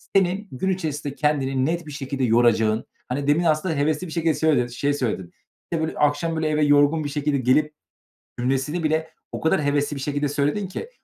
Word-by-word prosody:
senin 195 +2 +2
gün 160 +9 -2
içerisinde 150 -6 -3
kendini 135 -3 +1
net 170 +2 -1
bir - - -7
şekilde 135 -2 -4
yoracağın, 110 -2 +3 0.2
hani, 140 +3 -3
demin 150 +4 +3
aslında 160 +1 +1
hevesli 150 +5 0
bir 160 - -9
şekilde 165 -1 +1
söyle 150 -5 +2
şeyi 140 +4 -1
söyledin, 110 -10 -3 0.4
işte, 165 -2 0
böyle, - - -6
"Akşam 150 +3 +1
böyle 160 0 0
eve 150 0 +1
yorgun 145 +2 +4
bir 145 - -3
şekilde 145 0 0
gelip." 150 +4 +2 0.7
cümlesini 135 +7 -1
bile 160 +1 0 0.2
o - - -4
kadar 160 -2 +1
hevesli 145 +1 +1
bir - - -5
şekilde 145 +1 -1
söyledin 145 +8 0
ki 455 - -6
145 Hz, 190 wpm, -23 LUFS, 135-160 Hz, 0.7 s, yorgun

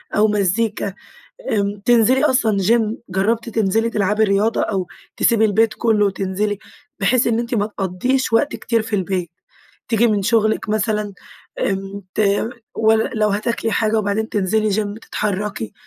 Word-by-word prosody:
أو 215 +1 +4
مزيكا، 205 0 0 0.6
آمم 200 -1 -1
تنزلي 245 +4 +4
أصلًا 230 -7 +2
Gym 220 +3 +2
جربتِ 220 +5 0
تنزلي 225 +1 +1
تلعبي 210 0 +1
رياضة، 205 +3 +1
أو 190 -4 -1 0.3
تسيبي 230 -2 +3
البيت 220 +1 +2
كله 215 -3 +2
وتنزلي، 195 +1 -2 0.4
بحيث 240 +5 +2
إن 230 -1 +1
أنتِ 235 +1 -2
ما 205 -1 +1
تقضّيش 215 +6 -1
وقت 280 +6 +2
كتير 230 -2 0
في 220 -1 -2
البيت، 185 -3 -2 0.6
تيجي 230 +1 +3
من 210 -3 +1
شغلك 220 0 +1
مثلًا، 210 -1 -1 0.5
آمم 195 +1 -2
ت - - 0 0.9
لو 215 -1 +2
هتاكلي 225 +2 -1
حاجة 220 +1 +1
وبعدين 215 +1 -1
تنزلي 215 +2 +1
Gym 210 +1 -2
تتحركي، 200 - -3
215 Hz, 140 wpm, -19 LUFS, 200-225 Hz, 0.9 s, أو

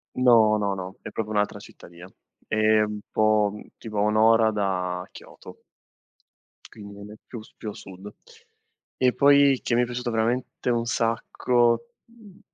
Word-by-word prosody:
No, 115 -4 +4
no, 100 -2 -1
no, 95 0 -8
è - - -8
proprio 110 -1 -4
un'altra 105 0 0
cittadina. 85 +1 -14 0.4
È 110 0 +2
un 105 0 -3
po' 110 -1 +2
mhmm, 105 - -11
tipo 110 -2 -8
a - - +2
1 105 +1 +1
ora 110 0 +4
da 90 -3 -2
Kyoto - - -14 1.1
quindi 100 -2 -12
non 100 +1 -11
è - - -11
più 115 - -8
s 110 - -18
più 110 - -6
a - - -7
sud. 95 +2 -12 0.8
E 125 -1 +2
poi, 140 -1 +4
che 120 - -1
mi 120 - +3
è - - 0
piaciuto 120 0 -4
veramente 120 +3 -2
un 120 -1 0
sacco, 120 - 0 0.2
mhmm, 220 -4 -18
110 Hz, 170 wpm, -24 LUFS, 105-120 Hz, 1.1 s, No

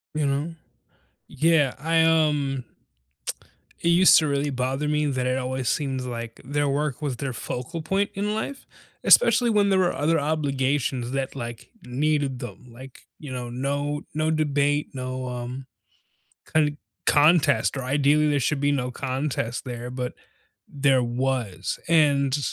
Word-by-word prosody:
You 150 -2 +1
know? 145 +4 -1 0.7
Yeah, 155 -4 +2
I, 165 +3 +2
um 150 -5 +2 1.2
it 170 - +1
used 175 +2 +7
to 155 - 0
really 140 0 0
bother 135 +2 -1
me 150 0 +1
that 130 -3 -1
it 130 +1 +1
always 130 -1 -3
seems 135 -3 -1
like 115 -2 -6
their 145 +2 0
work 145 0 -1
was 135 -5 -2
their 135 -1 -3
focal 145 +8 -5
point 195 +5 0
in 205 +2 -1
life, 245 +6 -4 0.4
especially 255 - +6
when 205 -2 +3
there 190 -1 +3
were 180 -1 +2
other 160 +3 +2
obligations 140 -4 -1
that, 135 0 -3
like, 120 -3 -7 0.2
needed 140 0 0
them, 125 +1 -8
like, 130 +2 -12 0.2
you 145 -4 -8
know, 125 -1 -5
no 145 +4 -2
no 155 +1 0
debate, 145 -1 +1
no, 130 0 -4
um, 125 +2 -5 0.8
con 150 -2 +1 0.3
contest, 150 -2 +4
or 135 - -3
ideally 145 +3 +3
there 145 -2 +2
should 140 +3 0
be 145 0 +2
no 125 -3 -1
contest 130 -2 -3
there, 120 -1 -6
but, 125 -1 -4 0.6
there 135 -2 +3
was, 120 -4 -2
and, 145 -4 +3
140 Hz, 150 wpm, -25 LUFS, 130-150 Hz, 1.2 s, used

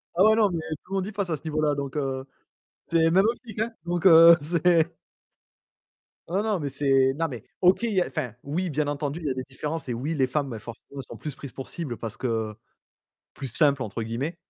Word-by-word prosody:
Ah 180 - +5
ouais, 220 +1 +6
non, 215 -2 +4
mais 170 -3 -2 0.2
tout 185 - -20
le - - -1
monde 190 0 -1
y - - -5
passe 200 -3 -3
à 160 - 0
ce 145 - -17
niveau-là 155 -2 0
donc, 140 -2 -4
heu, 135 -2 -2 0.6
c'est 165 -1 +3
même 190 +4 +5
optique 230 -2 -3
hein 225 +2 0
donc 175 +1 -2
heu, 165 -1 +10
c'est 170 +1 +2 1.3
Non, 190 +5 0
non 215 -4 0
mais 145 -3 -3
c'est 135 -1 +3
non 165 +2 0
mais 120 -6 -7 0.2
OK, 185 +5 +4
il 230 -2 0
y 190 - +3
a, - - 0
enfin, 130 -8 -4
oui 175 +6 -2
bien 150 0 -1
entendu, 145 +2 -2
il 165 - -8
y - - +1
a - - 0
des 130 0 -4
différences 150 +3 -5
et - - 0
oui, 135 +8 -2
les 135 -3 +2
femmes, 140 +1 -1
bah 115 -3 -6
forcément, 115 +5 -10
elles - - -4
sont - - -6
plus 150 - -5
prises 140 - -9
pour 135 - -8
cible 145 -9 -4
parce 115 -1 -6
que 110 -3 -2 0.8
«plus 135 - -6
simple» 140 +2 +2
entre 115 -1 -4
guillemets. 120 +10 -3
150 Hz, 240 wpm, -26 LUFS, 135-175 Hz, 1.3 s, heu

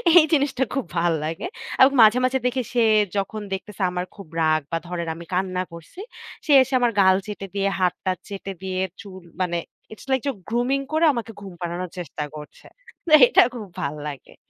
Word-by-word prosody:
এই 340 - +9
জিনিসটা 275 -2 +2
খুব 270 -2 -1
ভাল 170 0 +2
লাগে। 165 - -4 0.3
আর - - +9
ও - - +1
কে - - -4
মাঝে, 220 +3 +7
মাঝে 260 +1 +1
দেখে 255 +1 +1
সে 240 -2 +3 0.3
যখন 210 +2 -2
দেখতেছে 195 +1 -6
আমার 180 0 -3
খুব 200 -5 -11
রাগ 155 -1 +3
বা 165 - +1
ধরেন, 170 -1 -4
আমি 170 0 -10
কান্না 185 0 0
করছি। 170 - -12 0.5
সে 300 - 0
এসে 265 +1 -8
আমার 240 -1 +2
গাল 190 0 +6
চেটে 195 -1 -6
দিয়ে 200 0 +1
হাত-টাত 185 0 0
চেটে 195 -1 -6
দিয়ে 185 0 -2 0.2
চুল 190 -3 -11 0.2
মানে 175 -1 -1 0.3
It's - - -13
like 260 -2 +1
যে - - +2 0.2
grooming 250 +4 0
করে 320 +1 +3
আমাকে 230 -2 -4
ঘুম 195 -2 -9
পাড়ানোর 175 +1 -4
চেষ্টা 155 -2 -5
করছে। 150 -1 -11 0.4
তে 310 - +2
এটা - - +6
খুব 220 -3 -6 0.2
ভাল 140 +2 -2
লাগে। 140 -2 -9
195 Hz, 200 wpm, -23 LUFS, 175-240 Hz, 0.5 s, এই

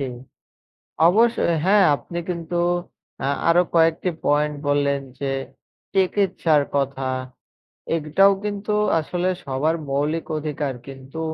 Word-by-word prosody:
জি, 135 - -1 1.0
অবশ্যই 215 -3 +3
হ্যাঁ। 200 +1 +5
আপনি 170 +4 -7
কিন্তু 170 -1 -3 0.7
আ - - +1 0.2
আরো 170 +1 +5
কয়েকটি 165 +2 +3 0.2
পয়েন্ট 150 +1 +2
বললেন, 140 -1 +1 0.2
যে 140 -1 -1 0.6
চিকিৎসার 185 -5 +2
কথা। 135 -1 -1 0.9
এটাও 165 +5 +4
কিন্তু 205 0 -2 0.3
আসলে 175 +3 -1 0.2
সবার 140 +4 0 0.2
মৌলিক 150 +4 -1
অধিকার। 150 -2 -3
কিন্তু 135 +3 -9
160 Hz, 105 wpm, -22 LUFS, 145-180 Hz, 1.0 s, হ্যাঁ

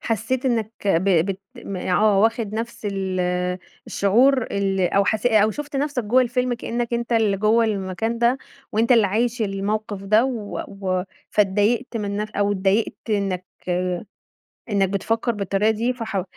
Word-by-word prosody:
حسيت 235 +4 -1
إنك 225 -3 0
ب 190 0 +2 0.2
بت 195 -1 -3 0.2
م 195 - -5
آه 195 +3 +2
واخد 225 -1 +1
نفس 225 -1 -4
ال 190 -2 -2 0.7
الشعور 250 +6 +3
ال 195 -2 -1
أو 200 0 +4
حس 215 +3 0
أو 215 -2 +4
شُفت 295 +4 -5
نفسك 280 -3 -1
جوه 250 +5 +4
الفيلم 250 0 0
كأنك 235 0 -3
أنت 235 0 -2
اللي 220 -4 +3
جوه 215 +3 +3
المكان 210 +2 -2
ده، 240 +3 +3 0.3
وأنت 230 +4 +3
اللي 225 -4 +5
عايش 230 +3 0
الموقِف 205 0 -2
ده 215 +4 +4
و 230 -6 -3
و 185 -2 -2 0.3
فاتضايقت 210 +5 +1
من 205 -2 -3
نف 210 +1 -3
أو 205 -1 0
اتضايقت 200 +3 +1 0.2
إنك 195 -3 -1 1.3
إنك 195 -3 +2
بتفكّر 225 +4 0
بالطريقة 200 0 +1
دي 230 +3 0
فحاو 220 -6 -3
215 Hz, 155 wpm, -22 LUFS, 200-235 Hz, 1.3 s, اللي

